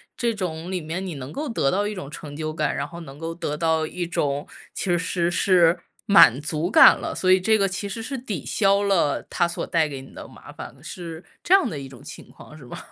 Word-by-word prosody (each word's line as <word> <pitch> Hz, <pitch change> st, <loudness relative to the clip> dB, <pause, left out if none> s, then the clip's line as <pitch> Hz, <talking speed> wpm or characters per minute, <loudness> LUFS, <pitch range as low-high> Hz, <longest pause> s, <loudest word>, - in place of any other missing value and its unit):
这 235 Hz, -1 st, 0 dB
种 180 Hz, -4 st, -5 dB
里 185 Hz, -, -1 dB
面 170 Hz, +4 st, -5 dB
你 180 Hz, -4 st, -5 dB
能 135 Hz, +1 st, -8 dB
够 300 Hz, 0 st, -4 dB
得 185 Hz, -12 st, +1 dB
到 200 Hz, +7 st, 0 dB
一 210 Hz, -, -2 dB
种 185 Hz, -8 st, -7 dB
成 150 Hz, -1 st, -9 dB
就 155 Hz, +1 st, -4 dB
感， 155 Hz, -1 st, -1 dB
然 140 Hz, +1 st, -3 dB
后 170 Hz, +2 st, -10 dB
能 140 Hz, -3 st, -11 dB
够 165 Hz, +1 st, -5 dB
得 150 Hz, -3 st, -4 dB
到 160 Hz, -1 st, +1 dB
一 175 Hz, +2 st, -4 dB
种 145 Hz, -4 st, -2 dB, 0.3 s
其 -, -, -4 dB
实 175 Hz, -, +3 dB
是 170 Hz, +1 st, -1 dB
是 175 Hz, -1 st, +3 dB, 0.3 s
满 195 Hz, -, +7 dB
足 155 Hz, +4 st, -3 dB
感 -, -, +8 dB
了， -, -, -4 dB
所 185 Hz, -, -1 dB
以 185 Hz, 0 st, +5 dB
这 220 Hz, +3 st, +3 dB
个 200 Hz, -2 st, +2 dB
其 195 Hz, +1 st, -4 dB
实 225 Hz, +3 st, -5 dB
是 270 Hz, +4 st, -5 dB
抵 215 Hz, -, -5 dB
消 200 Hz, -1 st, +2 dB
了 185 Hz, -8 st, +1 dB
它 175 Hz, -, +1 dB
所 170 Hz, -, -4 dB
带 160 Hz, -2 st, +1 dB
给 135 Hz, -2 st, -6 dB
你 135 Hz, -, -14 dB
的 -, -, -8 dB
麻 -, -, -14 dB
烦 -, -, -9 dB
的， 135 Hz, -, -21 dB
是 165 Hz, +1 st, -8 dB, 0.2 s
这 360 Hz, -, +2 dB
样 390 Hz, -2 st, +5 dB
的 155 Hz, -, -5 dB
一 135 Hz, -1 st, -8 dB
种 125 Hz, -3 st, -14 dB
情 -, -, -11 dB
况， 155 Hz, -, -14 dB
是 150 Hz, -, -14 dB
吧？ 120 Hz, -, -10 dB
170 Hz, 275 characters per minute, -23 LUFS, 150-195 Hz, 0.3 s, 感